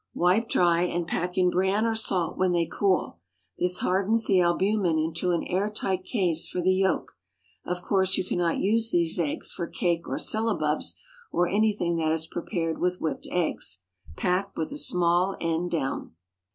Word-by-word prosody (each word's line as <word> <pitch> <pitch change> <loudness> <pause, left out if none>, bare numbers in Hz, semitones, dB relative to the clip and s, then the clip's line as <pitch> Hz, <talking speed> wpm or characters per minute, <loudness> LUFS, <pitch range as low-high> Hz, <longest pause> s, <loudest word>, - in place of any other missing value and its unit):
Wipe 185 +7 +2
dry, 170 -1 +3
and 175 -1 -1
pack 180 +2 -2
in 180 -1 +3
bran 190 +4 +1
or 225 - +1
salt 190 -7 +1
when 185 -1 +1
they 170 -1 +2
cool. 185 - 0 0.4
This 180 0 +1
hardens 200 +5 +2
the 190 -2 +4
albumen 180 0 +2
into 165 +3 -1
an 170 -1 +1
air 195 +4 -1
tight 190 -3 -2
case 180 -7 +1
for - - -3
the 185 +1 +3
yolk. 190 - 0 0.5
Of 180 0 -3
course, 190 -1 +2
you - - 0
cannot 175 -1 0
use 225 +3 +2
these 170 -2 +1
eggs 155 -4 -1
for 170 - -4
cake 170 -2 -1
or - - -2
syllabubs, 210 -9 -1 0.4
or 175 - +2
anything 200 -3 +1
that 160 -1 +1
is 160 0 -2
prepared 165 -1 -3
with 180 0 0
whipped 155 -4 -3
eggs. 105 - -2 0.3
Pack 190 - -1
with 160 - -2
the 290 - -5
small 180 -2 +2
end 165 +1 -1
down. 135 - -3
180 Hz, 175 wpm, -26 LUFS, 170-195 Hz, 0.5 s, the